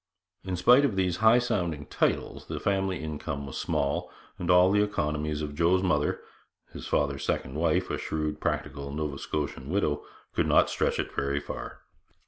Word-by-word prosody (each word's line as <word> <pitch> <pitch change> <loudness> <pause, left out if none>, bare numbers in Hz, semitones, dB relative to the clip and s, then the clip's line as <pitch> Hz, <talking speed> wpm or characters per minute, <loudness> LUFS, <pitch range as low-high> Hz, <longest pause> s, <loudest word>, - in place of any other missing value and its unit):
But 95 - -8
in 90 - 0
spite 125 +10 +6
of 130 -8 +1
these 90 -2 +1
high 110 +2 +6
sounding 85 -11 -1
titles, - - -1
the - - -4
family 95 -2 0
income 75 -2 -4
was 70 - -6
small, 70 0 -1 0.3
and 90 - -3
all 90 +1 +6
the 105 +1 +4
economies 75 -6 -1
of 75 -1 -4
Joe's 85 +4 +3
mother 75 -6 +1 0.5
his - - -7
father's 70 -2 0
second 65 - -1
wife, 80 +1 +1
a - - -2
shrewd 75 -1 -2
practical 70 0 -3
Nova 75 -2 -3
Scotian 70 -3 -4
widow 80 -6 0 0.3
could - - +1
not - - +4
stretch - - 0
it - - -3
very 70 +1 0
far. - - -7
80 Hz, 175 wpm, -28 LUFS, 75-95 Hz, 0.5 s, spite